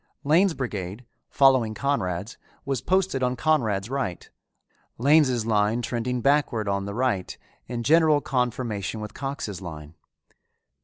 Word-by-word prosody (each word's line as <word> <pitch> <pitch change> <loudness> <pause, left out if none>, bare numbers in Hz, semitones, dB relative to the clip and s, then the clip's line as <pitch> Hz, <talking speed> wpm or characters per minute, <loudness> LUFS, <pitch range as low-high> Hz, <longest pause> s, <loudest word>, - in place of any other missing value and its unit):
Lane's 165 +5 +3
brigade, 105 -2 -5 0.2
following 130 -6 +3
Conrad's, 105 -8 -2 0.3
was 135 -4 -2
posted 185 -3 +1
on 125 0 +1
Conrad's 115 -8 +1
right, 125 -9 -3 0.7
Lane's 130 -3 +3
line 110 +2 +1
trending 120 +1 -2
backward 135 -5 +1
on 100 0 -1
the 100 0 -5
right 120 -7 -1 0.3
in 120 -1 -4
general 155 +2 +4
conformation 120 -6 -2
with 105 0 -7
Cox's 135 -9 -5
line. 75 -3 -8
120 Hz, 120 wpm, -25 LUFS, 105-140 Hz, 0.7 s, general